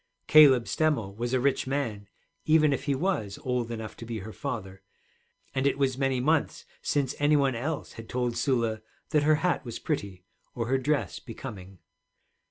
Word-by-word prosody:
Caleb 135 -6 +7
Stemmel 145 -11 0
was 120 +2 -3
a 130 - +2
rich 135 +1 +1
man 115 -7 -2 0.4
even 155 -2 +4
if 135 - -3
he 140 -1 +1
was 130 - -1
old 125 -2 -1
enough 110 -2 -6
to - - -9
be 115 -1 -4
her 110 +1 -7
father, 95 -9 -5 0.7
and 135 +1 +1
it 140 - +1
was 135 -2 +1
many 135 -1 0
months 150 +4 0 0.2
since 140 -2 0
any 145 +1 +4
one 140 -2 +3
else 145 +7 -3
had 115 0 -10
told 125 -1 -1
Sula 115 -5 0 0.3
that 150 -2 +4
her 155 +1 +4
hat 180 - +1
was 120 -3 -6
pretty 100 - -4 0.3
or 115 - -2
her 135 0 +2
dress 150 +2 -1
becoming. 105 -6 -9
130 Hz, 180 wpm, -28 LUFS, 115-145 Hz, 0.7 s, Caleb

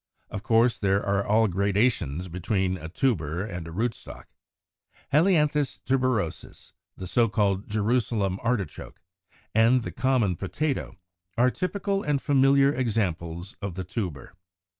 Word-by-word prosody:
Of 100 - -4
course, 115 +2 +3
there 100 0 +1
are 100 0 +1
all 110 +2 +3
gradations 100 - 0
between 90 +2 -1
a 80 -3 -8
tuber 90 - -1
and 90 -6 -6
a - - -8
rootstock. 115 +6 -4 0.9
Helianthus 150 -4 +3
tuberosus, 130 -10 -2 0.2
the 95 - -6
so 115 +5 +2
called 100 -2 0
Jerusalem 105 -3 0
Artichoke 115 -8 -3 0.3
(Fig. - - -32 0.2
101), 115 +2 +5
and 130 -2 +2
the - - -5
common 125 -9 +1
Potato, 135 - -3 0.4
are 125 +2 +4
typical 195 +4 -2
and 150 -4 0
familiar 140 0 +4
examples 90 - -2
of 100 -4 -4
the 95 - -4
tuber. 90 - -5
110 Hz, 135 wpm, -26 LUFS, 95-130 Hz, 0.9 s, 101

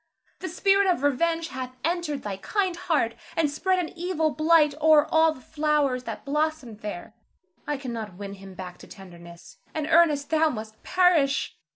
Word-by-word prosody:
The 370 - -5
spirit 390 +3 +3
of 350 -7 +1
revenge 330 +4 +1
hath 255 -3 -6
entered 325 -4 -1
thy 200 -2 -4
kind 375 - -1
heart, 300 -9 0 0.2
and 310 -3 +2
spread 370 +5 +1
an 355 -3 -1
evil 335 -3 0
blight 310 -1 +4
o'er 305 -1 +6
all 320 0 +4
the 260 - -11
flowers 295 -4 0
that - - -6
blossomed 295 -6 -2
there. 210 -1 -7 0.5
I 295 - -1
cannot 230 -7 -6
win 200 0 -7
him 195 -1 -12
back 180 -1 -8
to - - -13
tenderness, 175 -2 -13 0.2
and 310 -1 -1
Ernest, 310 -3 +3
thou 320 0 +4
must 220 -4 -7
perish. 340 -7 +2
295 Hz, 170 wpm, -26 LUFS, 230-330 Hz, 0.5 s, o'er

